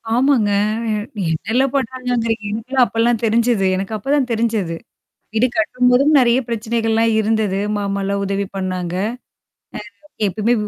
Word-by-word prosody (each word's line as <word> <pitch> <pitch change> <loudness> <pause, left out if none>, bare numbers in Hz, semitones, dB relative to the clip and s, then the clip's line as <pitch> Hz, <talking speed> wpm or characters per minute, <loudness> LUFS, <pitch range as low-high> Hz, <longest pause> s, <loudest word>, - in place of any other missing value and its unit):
ஆமாங்க. 250 -4 +3 0.7
நீ - - -2
என்னால்லாம் 245 - 0
பண்ணாங்கங்கிறீங்க? 245 -3 -1
எனக்குலாம் 250 +4 +1
அப்பலாம் 230 0 +1
தெரிஞ்சது 225 -2 +2
எனக்கு 195 +3 -3
அப்ப 270 +6 -4
தான் 265 -4 0
தெரிஞ்சது. 220 -7 -1 0.6
இது 245 - +4
கட்டும்போதும் 250 +6 +3
நெறையா 245 -1 +4
பிரச்சனைகள்லாம் 225 0 0
இருந்தது. 215 -3 0 0.2
மாமால்லாம் 200 0 -2
உதவி 200 0 -2
பண்ணாங்க. 185 -2 -3 1.1
அம், 300 - -24 0.2
எப்பயுமே 220 +5 +1
225 Hz, 120 wpm, -19 LUFS, 200-250 Hz, 1.1 s, இது